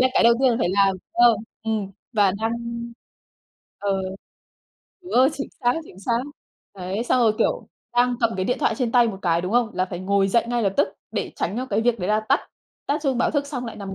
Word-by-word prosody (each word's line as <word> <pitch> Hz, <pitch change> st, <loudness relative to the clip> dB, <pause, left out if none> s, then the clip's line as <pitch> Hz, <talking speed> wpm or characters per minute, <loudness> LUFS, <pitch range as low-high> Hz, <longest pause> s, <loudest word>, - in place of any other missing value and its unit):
là 255 Hz, -, +5 dB
cái -, -, +4 dB
đầu 235 Hz, -, +7 dB
tiên 265 Hz, -, +5 dB
là 230 Hz, -, +1 dB
phải 200 Hz, -, +1 dB
làm. 195 Hz, -1 st, +3 dB, 0.2 s
Ơ, 240 Hz, -1 st, +6 dB, 0.3 s
ừ, 225 Hz, -, -1 dB, 0.4 s
và 205 Hz, -3 st, +4 dB
đang 225 Hz, +1 st, 0 dB, 1.3 s
ờ, 195 Hz, -1 st, -1 dB, 1.0 s
đúng 360 Hz, -, -9 dB
rồi, 260 Hz, +2 st, +6 dB
chính 280 Hz, -, -5 dB
xác, 245 Hz, 0 st, +2 dB
chính 185 Hz, -, -15 dB
xác. 230 Hz, +3 st, 0 dB, 0.6 s
Đấy, 190 Hz, +4 st, -3 dB
xong 250 Hz, -, +2 dB
rồi, 225 Hz, -2 st, +4 dB
kiểu, -, -, 0 dB, 0.3 s
đang 245 Hz, 0 st, +4 dB
cầm 225 Hz, -3 st, +1 dB
cái 185 Hz, -, -1 dB
điện 250 Hz, +6 st, 0 dB
thoại -, -, +2 dB
trên 245 Hz, -4 st, -2 dB
tay 240 Hz, -2 st, +5 dB
một 195 Hz, -3 st, -5 dB
cái, 170 Hz, -2 st, +2 dB
đúng 180 Hz, +4 st, -4 dB
không? 240 Hz, -2 st, +2 dB
Là 185 Hz, -, +1 dB
phải 180 Hz, -2 st, -6 dB
ngồi 195 Hz, +1 st, +2 dB
dậy 235 Hz, +4 st, +3 dB
ngay 240 Hz, -1 st, 0 dB
lập 195 Hz, -1 st, 0 dB
tức 200 Hz, -, +3 dB, 0.2 s
để 215 Hz, -, -3 dB
tránh 195 Hz, +6 st, -2 dB
cho 255 Hz, +1 st, -2 dB
cái 210 Hz, -1 st, 0 dB
việc 235 Hz, -1 st, +1 dB
đấy 180 Hz, -, -2 dB
là 215 Hz, +1 st, +3 dB
tắt 275 Hz, -, +4 dB, 0.5 s
tắt 295 Hz, +2 st, -1 dB
chuông 265 Hz, -4 st, 0 dB
báo -, -, +2 dB
thức 285 Hz, -2 st, 0 dB
xong 255 Hz, -4 st, -4 dB
lại 230 Hz, -, -7 dB
nằm 195 Hz, -2 st, -6 dB
225 Hz, 235 wpm, -23 LUFS, 195-245 Hz, 1.3 s, đầu